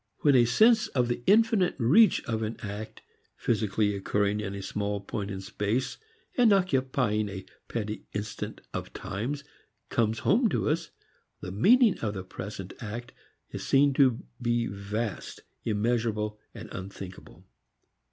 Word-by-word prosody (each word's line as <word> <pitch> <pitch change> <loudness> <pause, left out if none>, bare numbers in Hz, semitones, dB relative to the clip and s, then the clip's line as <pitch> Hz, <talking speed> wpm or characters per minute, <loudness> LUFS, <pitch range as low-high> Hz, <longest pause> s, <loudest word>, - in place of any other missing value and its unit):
When 145 - +5
a 120 -2 +6
sense 220 - +5
of 125 -2 0
the 120 - -1
infinite 215 -3 +4
reach 155 - +5
of 110 -1 -2
an 110 +1 -3
act 105 0 -7 0.3
physically 105 -2 0
occurring 100 +1 0
in 100 -2 -4
a 100 - -6
small 100 +1 -2
point 100 0 -4
of 95 -1 -5
space 105 +7 -2 0.4
and 245 -4 +5
occupying 130 - +1
a 95 -1 -7 0.2
petty 110 -2 -4
instant 105 +2 -5
of - - -5
times 115 +9 -4 0.5
comes 115 -1 +1
home 230 +3 +4
to - - 0
us, 155 +3 -1 0.5
the 90 - -5
meaning 220 - +5
of 105 -2 -2
a 95 - -4
present 95 0 -7
act 120 +2 -6 0.4
is - - -5
seen 140 +1 +4
to 130 -4 +3 0.2
be 120 -1 +1
vast, 100 +1 -4 0.2
immeasurable, 105 -1 0 0.2
unthinkable. 100 -3 -9
110 Hz, 140 wpm, -28 LUFS, 105-130 Hz, 0.5 s, a